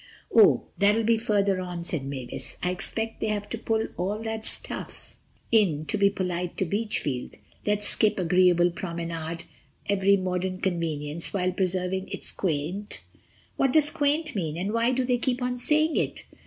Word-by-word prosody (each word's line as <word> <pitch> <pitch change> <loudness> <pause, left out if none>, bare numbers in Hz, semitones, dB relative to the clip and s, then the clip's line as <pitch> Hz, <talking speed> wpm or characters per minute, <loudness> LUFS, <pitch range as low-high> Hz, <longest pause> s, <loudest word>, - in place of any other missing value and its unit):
"Oh, 220 -3 +7 0.2
that'll 205 +3 +4
be 225 0 +3
further 200 -3 +1
on," 175 -2 -5
said 165 -4 -2
Mavis. 130 -3 -5
"I 180 - +1
expect 225 +5 -3
they - - 0
have 205 -1 -2
to 230 - -3
put 225 -1 -1
all 195 +4 -1
that 220 0 -4
stuff - - -2 0.3
in 180 -10 +3
to - - -1
be 200 -1 +4
polite 180 -2 -3
to 190 - +1
Beachfield—let's 205 - -2
skip—'agreeable 180 -3 +3
promenade, 170 -2 -5 0.4
every 200 0 +3
modern 185 0 -2
convenience, 165 -4 -2
while 185 -1 +1
preserving 185 0 -1
its - - -1
quaint....' 180 +4 -3 0.5
What 270 -2 +2
does 300 -1 +6
quaint 300 +1 0
mean, 165 -5 -2
and 195 +4 -2
why 230 +2 +2
do 255 0 0
they 245 -1 +1
keep 250 0 0
on 250 0 -2
saying 310 +4 +2
it?" - - -1
195 Hz, 155 wpm, -26 LUFS, 175-225 Hz, 0.5 s, Oh